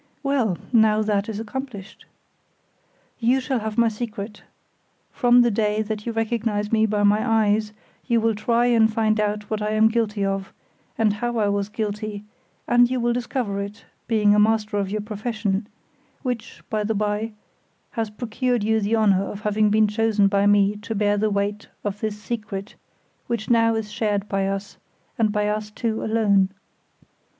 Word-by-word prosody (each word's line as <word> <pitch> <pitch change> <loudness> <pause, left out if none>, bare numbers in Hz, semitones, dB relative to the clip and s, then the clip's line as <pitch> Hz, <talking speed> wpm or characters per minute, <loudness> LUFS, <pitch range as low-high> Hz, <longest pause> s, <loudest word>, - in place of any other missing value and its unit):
Well! 255 -10 +1 0.2
Now 215 -2 +4
that 205 0 0
is 215 -1 -4
accomplished. 225 -3 -7 1.1
You 245 +3 +3
shall 260 -1 -1
have 220 0 -5
my 235 -1 +5
secret; 210 -2 -5 0.7
from 245 -1 +5
the 240 -1 +3
day 210 0 +1
that 215 +1 -5
you - - 0
recognize 225 -2 -1
me 220 -1 +3
by 210 -1 0
my 205 +1 +4
eyes, 215 -2 +2 0.4
you 235 -2 +3
will 225 0 +2
try 235 +3 +1
and 225 -2 +4
find 215 -1 +1
out 210 0 -1
what 215 -1 -1
I 210 0 -1
am 220 +1 +5
guilty 220 -3 0
of, 195 0 -3 0.4
and 215 -2 +3
how 240 +2 -2
I 210 -2 +2
was 200 0 -1
guilty, 210 -1 -4 0.4
and 245 0 +5
you 255 0 -1
will 240 0 +1
discover 240 -4 -2
it, 200 +2 -8 0.2
being 210 -3 +4
a 210 - +4
master 215 0 +2
of 200 -1 -1
your 210 +1 -2
profession, 210 -1 -2 0.6
which, 245 -4 -4
by 215 -1 0
the 220 +1 -1
by, 210 +2 -1 0.6
has 225 -2 -2
procured 240 +2 -1
you 220 +1 +2
the 210 +3 +1
honor 205 -4 +3
of 200 +1 -7
having 210 0 +2
been 215 +1 +4
chosen 210 -1 +2
by 200 0 +2
me 205 0 +4
to 210 +2 -5
bear 205 0 +2
the 215 +1 +1
weight 205 +1 -2
of 205 0 -3
this 210 -1 -3
secret, 210 -2 -5 0.5
which 235 -1 -2
now 230 -1 +4
is 215 -1 -3
shared 210 -2 -1
by 195 -1 0
us, 195 +1 -4 0.4
and 215 -2 +3
by 210 0 0
us 210 0 -2
two 220 +1 -3
alone. 205 -4 +3
215 Hz, 175 wpm, -23 LUFS, 205-225 Hz, 1.1 s, my